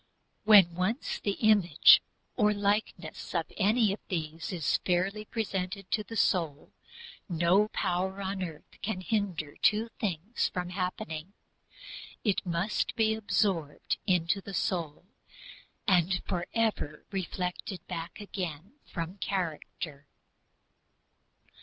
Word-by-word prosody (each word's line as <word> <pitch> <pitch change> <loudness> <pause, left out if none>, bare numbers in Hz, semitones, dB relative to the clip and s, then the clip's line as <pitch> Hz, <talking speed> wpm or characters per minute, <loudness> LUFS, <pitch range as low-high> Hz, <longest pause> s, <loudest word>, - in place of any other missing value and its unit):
When 200 -5 +8
once 185 - -1
the 200 - 0
image 200 -8 +6 0.3
or 210 -3 +3
likeness 205 +1 -1
of - - -1
any 215 +1 +3
of 205 - -6
these 160 -1 -3
is 165 -6 +1
fairly 190 +4 0
presented 195 -3 -3
to 215 - +1
the 225 +3 -8
soul, 160 -8 +1 0.6
no 175 +5 +3
power 190 -1 -1
on 195 0 -3
earth 165 -4 -8
can 195 -3 -2
hinder 185 -8 -2
two 220 +2 +3
things 195 +2 -1
happening 180 -2 -3 0.9
it 205 -4 +1
must 175 +5 0
be 220 -1 +3
absorbed 195 -8 0
into 180 +1 +2
the 195 0 -7
soul 170 -3 -2 0.8
and 180 -1 +3
forever 185 -4 -1
reflected 180 -1 -4
back 170 +1 -6
again 190 - -6
from 175 +3 -5
character. 160 -6 -4
185 Hz, 110 wpm, -30 LUFS, 170-205 Hz, 0.9 s, When